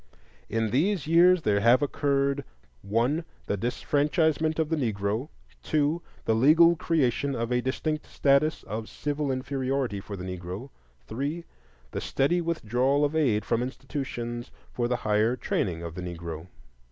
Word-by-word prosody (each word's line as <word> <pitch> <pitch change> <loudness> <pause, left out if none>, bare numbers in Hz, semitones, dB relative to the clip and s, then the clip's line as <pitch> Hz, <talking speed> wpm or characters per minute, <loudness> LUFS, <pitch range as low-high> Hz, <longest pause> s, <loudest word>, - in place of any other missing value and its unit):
In 110 0 0
these 170 - +1
years 170 +2 +5
there 100 -1 +2
have 120 +6 +5
occurred: 140 -1 +1 0.4
1. 120 - 0 0.2
The - - -1
disfranchisement 150 - +1
of 160 -2 0
the 165 - +1
Negro. 110 0 -1 0.3
2. 155 +2 +1 0.2
The 110 - +3
legal 160 +9 +6
creation 140 -4 0
of 115 0 -2
a 125 0 +2
distinct 155 +4 -2
status 140 +2 +2
of 110 +2 -5
civil 145 -1 -2
inferiority 130 -3 -1
for 100 +1 -7
the 90 - -6
Negro. 90 +7 -6 0.3
3. 145 - -3 0.5
The - - -3
steady 160 +6 +1
withdrawal 140 -3 +1
of 145 +2 -2
aid 115 -9 +2
from 115 0 +1
institutions 125 -2 -4 0.2
for 120 -1 0
the 125 - +1
higher 110 +3 +3
training 90 -7 -2
of 85 -1 -6
the 90 - -6
Negro. 85 -2 -6
130 Hz, 145 wpm, -27 LUFS, 110-150 Hz, 0.5 s, legal